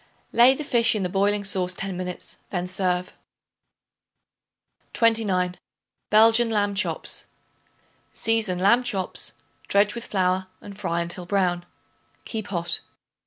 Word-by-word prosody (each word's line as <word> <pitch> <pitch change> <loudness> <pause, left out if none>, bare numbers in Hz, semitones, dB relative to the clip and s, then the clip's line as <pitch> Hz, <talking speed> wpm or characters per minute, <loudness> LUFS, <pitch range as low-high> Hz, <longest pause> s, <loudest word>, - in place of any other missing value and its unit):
Lay 245 +3 +6
the 300 - -5
fish 235 -5 +2
in 205 - -1
the 180 - -1
boiling 200 +2 +1
sauce 185 -2 0
ten 195 0 -4
minutes; 180 0 -6
then 180 -2 -2
serve. 180 -1 -1 1.8
29. 200 -6 +1 0.5
Belgian 225 +2 +6
Lamb 205 -2 +1
Chops. 200 +2 -1 0.8
Season 225 -5 0
lamb 200 +7 +4
chops; 195 -7 -2 0.3
dredge 200 +1 +3
with 235 0 -6
flour 185 -1 0
and 200 - -11
fry 170 -4 -2
until 175 +1 -5
brown; 180 -3 0 0.6
keep 220 -3 -5
hot. 170 -3 0
195 Hz, 120 wpm, -24 LUFS, 180-220 Hz, 1.8 s, Lay